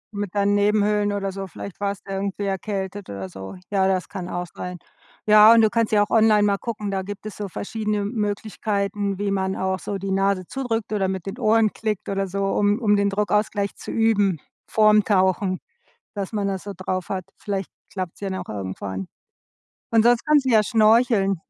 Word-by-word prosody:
Mit 205 -1 -4
deinen 200 0 +2
Nebenhöhlen 205 0 +2
oder 195 -1 -2
so. 195 0 -6
Vielleicht 190 +2 -9
warst 200 0 -3
du 195 - -8
ja 195 - -2
irgendwie 200 +1 -3
erkältet 195 0 -4
oder 95 -1 -6
so. 95 - -8 0.2
Ja, 190 -1 +3
das 185 -1 0
kann 185 -3 -6
auch 175 0 -3
sein. 180 0 -6 0.5
Ja, 215 +1 +8
und 230 - +6
du 220 - +4
kannst 230 -2 +1
ja 210 -1 +4
auch - - -5
online 215 -2 +5
mal 200 -1 +2
gucken, 210 -2 -4
da 195 -1 -1
gibt 205 +2 -8
es 215 - -6
so 205 -1 -4
verschiedene 210 +2 -3
Möglichkeiten, 205 -2 -2
wie 200 0 -1
man 190 -1 -1
auch 190 0 -1
so 200 +2 -4
die 195 0 -4
Nase 195 -1 +1
zudrückt 230 -5 -3
oder 195 -2 +1
mit 190 -2 -4
den 200 +5 -6
Ohren 220 -2 +3
klickt 215 -3 -3
oder 195 0 -1
so, 195 +1 -2
um 205 +1 +2
um 210 -4 +3
den 200 0 +2
Druckausgleich 205 0 0
zu - - -10
üben, 205 -6 +2 0.3
vorm 215 -1 +5
Tauchen, 190 -1 +2 0.6
dass 200 -2 -4
man 205 -2 0
das 190 -2 -3
so 200 - -6
drauf 185 0 -3
hat. 185 -2 -3
Vielleicht 195 -2 -4 0.2
klappt's 185 -3 -5
ja 195 - -2
dann 190 - -3
auch - - -8
irgendwann. 95 -1 -5 0.8
Und 225 -1 +5
sonst 240 0 +4
kannst 300 -2 +4
du 260 - +1
ja 220 -2 +5
schnorcheln. 215 -2 +3
200 Hz, 205 wpm, -23 LUFS, 190-215 Hz, 0.8 s, Ja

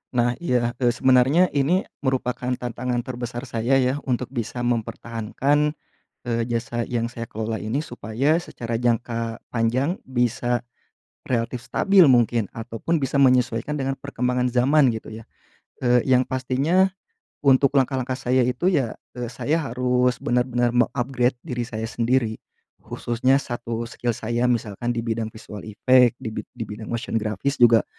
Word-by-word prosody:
Nah 120 0 +1
iya, 125 -7 +1
eee, 120 -2 +3
sebenarnya 130 +8 +4
ini 150 +7 +2 0.2
merupakan 130 -2 -1
tantangan 120 0 -3
terbesar 120 0 -5
saya 120 0 0
ya 130 +1 +2
untuk 125 -1 -1
bisa 120 -1 -4
mempertahankan, 120 +5 0 0.5
eee, 115 -1 0
jasa 120 0 -2
yang 115 -1 0
saya 115 0 -7
kelola 110 0 -3
ini 110 +6 -1
supaya 125 0 -1
secara 115 -8 -6
jangka 115 -1 -1 0.2
panjang 125 +8 +1
bisa 120 -1 -1 0.6
relatif 120 0 -2
stabil 190 +9 +4
mungkin 120 -4 +3
ataupun 115 +8 -2
bisa 135 -2 -3
menyesuaikan 125 +2 +2
dengan 135 0 -1
perkembangan 125 -2 -1
zaman 130 +3 +4
gitu 110 -1 -6
ya, - - -20 0.6
eee, 125 0 +5
yang 130 0 +4
pastinya 135 +9 +1 0.6
untuk 140 +1 +4
langkah-langkah 130 -1 +1
saya 130 0 +1
itu 125 +10 +1
ya, 130 -9 0 0.2
eee, 120 -1 -5
saya 150 +7 -1
harus 125 -2 +1
bener-bener 120 -2 +1
meng-upgrade 125 +1 +1
diri 120 -6 -3
saya 110 -2 -4
sendiri. 115 0 0 0.4
Khususnya 120 +3 0
1 120 -3 -3
skill 120 0 -3
saya 120 +2 0
misalkan 120 -1 -2
di 115 -1 -2
bidang 115 -1 -2
visual 110 -2 -10
effect, 125 +3 +4
di 115 -4 -6
bid - - -6
di 115 - -3
bidang 105 +1 -8
motion 115 -1 -2
grafis 110 +7 -2
juga 115 -2 +6
125 Hz, 145 wpm, -23 LUFS, 115-130 Hz, 0.6 s, juga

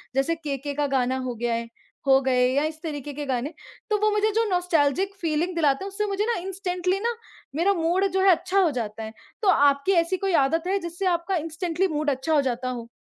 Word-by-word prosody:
जैसे 275 +5 +1
केके 285 -3 -4
का 290 0 0
गाना 260 -1 +1
हो 245 - -3
गया 235 +1 -1
है 230 0 -3 0.4
हो 270 0 +6
गए 250 -1 +3
या 285 - +2
इस 310 +1 -4
तरीके 290 -3 -5
के 295 +1 -5
गाने 265 +3 -2 0.4
तो 425 - +2
वो 430 +1 +3
मुझे 420 +1 +2
जो 455 - +3
नॉस्टेल्जिक 355 0 +1
फ़ीलिंग 335 +2 0
दिलाते 295 0 +2
हैं, 395 - -4
उससे 420 +2 -2
मुझे 405 +1 -1
ना 470 0 0
इंस्टेंटली 370 0 -2
ना, 470 +2 -1 0.4
मेरा 365 +5 +3
मूड 350 +2 +1
जो 380 0 +1
है 390 - +5
अच्छा 365 +3 +1
हो 345 -5 +3
जाता 225 -3 -4
है। 220 - -7 0.3
तो 425 - 0
आपकी 280 +2 +4
ऐसी 345 0 +2
कोई 390 -1 -1
आदत 325 +3 -1
है 395 +2 +1
जिससे 345 +2 -5
आपका 345 +3 -3
इंस्टेंटली 330 +3 -1
मूड 305 -2 -1
अच्छा 275 +4 -1
हो 295 - +5
जाता 255 -1 -2
हो? 235 -2 -5
325 Hz, 225 wpm, -25 LUFS, 275-380 Hz, 0.4 s, हो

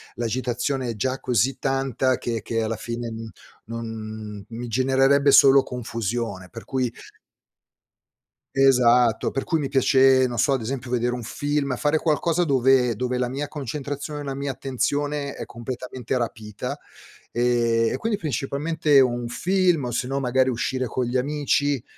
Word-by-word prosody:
l'agitazione 125 +2 -2
è 115 - -3
già 130 +5 -2
così 125 +2 +1
tanta 135 -1 0
che 115 -2 -3
che 115 0 -1
alla 110 +1 -2
fine, 120 +1 -5
mhmm, 110 0 -7 0.4
non 110 -2 -7
mi 120 +1 -6
genererebbe 135 +3 +3
solo 135 0 +7
confusione. 115 -5 -4
Per 115 - -10
cui 130 -3 -1 1.6
Esatto, 125 -3 +4
per 135 - -3
cui 165 - +1
mi 145 -3 -2
piace, 135 -1 +4
non 120 -1 -5
so, 140 - +2
ad 130 - -1
esempio 125 +1 -4
vedere 125 0 0
un 120 - -6
film, 145 +2 -1
fare 150 +5 +1
qualcosa 165 +2 +1
dove 130 -4 +3
dove 125 +2 -2
la 125 - 0
mia 140 +4 -4
concentrazione, 145 +1 -5
la 135 -1 -4
mia 140 0 -3
attenzione 145 +2 -2
è - - -6
completamente 125 +1 -5
rapita, 110 -3 -4 0.5
ehm, 115 -1 +2
e - - -1
quindi 225 -2 -2
principalmente 150 0 +1
un 120 -2 +2
film 180 +2 +1
o 120 - -3
sennò 130 +3 -1
magari 130 0 +2
uscire 130 +2 -1
con 125 +1 -2
gli 120 +2 -1
amici. 145 -1 0
130 Hz, 150 wpm, -24 LUFS, 120-140 Hz, 1.6 s, solo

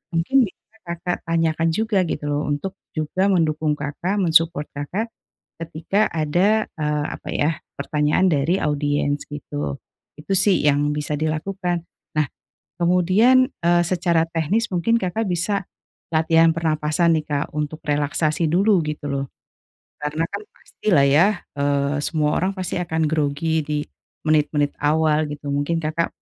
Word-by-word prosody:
mungkin 245 +9 +3
bisa 220 +3 -20
Kakak 170 0 -4
tanyakan 165 0 +1
juga 210 -4 +1
gitu 150 - -4
loh, 145 0 -1
untuk 145 +6 -2 0.2
juga 155 +5 0
mendukung 160 -5 +1
Kakak, 150 +7 -3
men-support 165 -5 +2
Kakak 185 +11 -4 0.5
ketika 165 +6 0
ada, 180 +8 +2
eee, 150 -1 0
apa - - -10
ya 150 +2 +2 0.3
pertanyaan 150 +5 +2
dari 165 +3 +2
audiens 145 -1 0
gitu. 145 - -5 0.4
Itu 175 +6 -2
sih 190 -2 +3
yang 145 0 +3
bisa 150 0 -2
dilakukan, 175 +3 -2 0.3
nah 155 -2 +2 0.5
kemudian, 190 +10 +4
eee, 175 0 +4
secara 170 -2 +1
teknis 170 +8 0
mungkin 230 +7 +2
Kakak 190 +5 -1
bisa 180 +2 -1 0.5
latihan 165 +1 +4
pernapasan 160 +1 +1
nih, 155 - -8
Kak, 145 -1 -1
untuk 150 +1 -3
relaksasi 150 +2 0
dulu 190 +3 +3
gitu 150 -1 -4
loh, 140 0 -1 0.8
karena 150 +2 -1
kan - - -3
pastilah 165 -10 +1
ya, 150 +7 +5 0.3
eee, 140 0 +1
semua 150 -2 0
orang 185 +3 0
pasti 185 -2 -3
akan 160 -2 -1
grogi 155 +1 0
di 150 0 -1 0.5
menit-menit 150 -1 +2
awal 155 +1 +2
gitu, 145 0 -7
mungkin 145 +4 0
Kakak 160 +1 -1
160 Hz, 135 wpm, -22 LUFS, 150-180 Hz, 0.8 s, ya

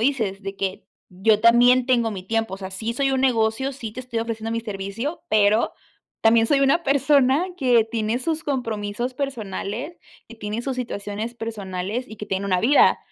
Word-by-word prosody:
dices 220 -6 0
de 195 0 -6
que: 190 -1 -3 0.2
"Yo 205 +4 +2
también 245 +2 +5
tengo 235 -3 +2
mi 185 -2 -6
tiempo". 225 -1 -1
O - - -8
sea, 190 -1 -7
sí, 220 +4 -3
soy 270 +1 +1
un 260 - +1
negocio, 235 +1 +1
sí, 230 -5 -7
te 255 - -6
estoy 245 -2 -4
ofreciendo 225 -1 -4
mi 230 - -1
servicio, 215 - -5
pero 215 +1 +3 0.5
también, 225 0 +5
soy 280 +1 +3
una 275 +5 +3
persona 275 +3 +3
que 250 -7 +4
tiene 225 0 -1
sus 320 +3 -2
compromisos 240 -3 -2
personales, 240 - -4 0.3
que 230 - -12
tiene 215 +2 -4
sus 265 -1 -3
situaciones 220 -1 -4
personales 210 0 -4
y - - -9
que 210 - -7
tiene 195 +1 -2
una 185 -2 +1
vida. 275 +6 +5
230 Hz, 185 wpm, -23 LUFS, 210-255 Hz, 0.5 s, también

